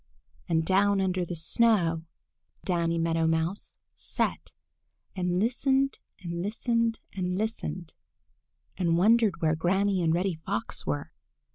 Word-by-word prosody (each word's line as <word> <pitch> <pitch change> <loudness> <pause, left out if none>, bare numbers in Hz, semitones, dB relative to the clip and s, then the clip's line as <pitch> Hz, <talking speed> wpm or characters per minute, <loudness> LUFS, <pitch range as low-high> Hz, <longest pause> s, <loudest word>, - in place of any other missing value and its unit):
And 160 -1 +2
down 195 +2 +3
under 185 -1 0
the 175 0 -5
snow 165 -2 +2 0.6
Danny 170 -2 0
Meadow 165 0 +1
Mouse 165 +4 -2 0.2
sat - - -3 0.6
and 180 -1 0
listened 265 +5 +1 0.2
and 170 -1 -4
listened 230 +3 0
and 180 -1 -2
listened, 200 -5 -4 0.8
and 170 -3 +2
wondered 210 -3 +3
where 155 0 +3
Granny 190 +3 +1
and 165 -2 +2
Reddy 180 +3 +1
Fox 115 - -3
were. 75 -1 -2
180 Hz, 120 wpm, -28 LUFS, 165-205 Hz, 0.8 s, down